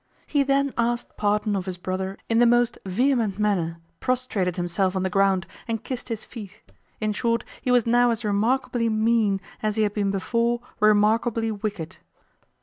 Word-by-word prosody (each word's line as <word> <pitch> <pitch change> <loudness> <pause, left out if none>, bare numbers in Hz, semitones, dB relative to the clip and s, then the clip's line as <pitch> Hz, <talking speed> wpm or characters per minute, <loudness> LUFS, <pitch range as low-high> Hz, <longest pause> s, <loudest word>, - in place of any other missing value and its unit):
He 290 - +1
then 275 0 +1
asked 240 +1 -1
pardon 210 0 +1
of 190 -1 -3
his 185 -1 -4
brother 190 +2 -3
in 225 0 +2
the 240 - +6
most 240 0 +3
vehement 230 0 +1
manner, 185 -6 0 0.2
prostrated 235 -8 -1
himself 180 +2 0
on 190 - 0
the 190 - -1
ground, 195 -3 +2 0.2
and 225 -2 -3
kissed 255 -1 -6
his 225 -2 -4
feet; 210 -6 -10 0.4
in 215 -1 0
short 230 +2 0 0.2
he - - -3
was 245 -2 +4
now 240 +1 +4
as 230 -1 -1
remarkably 230 +3 +1
mean 220 -2 +2 0.2
as 215 -1 0
he 220 - +2
had 205 -1 0
been 205 -2 0
before 235 +5 0 0.2
remarkably 220 +2 +3
wicked. 200 -5 -5
215 Hz, 170 wpm, -24 LUFS, 195-235 Hz, 0.4 s, the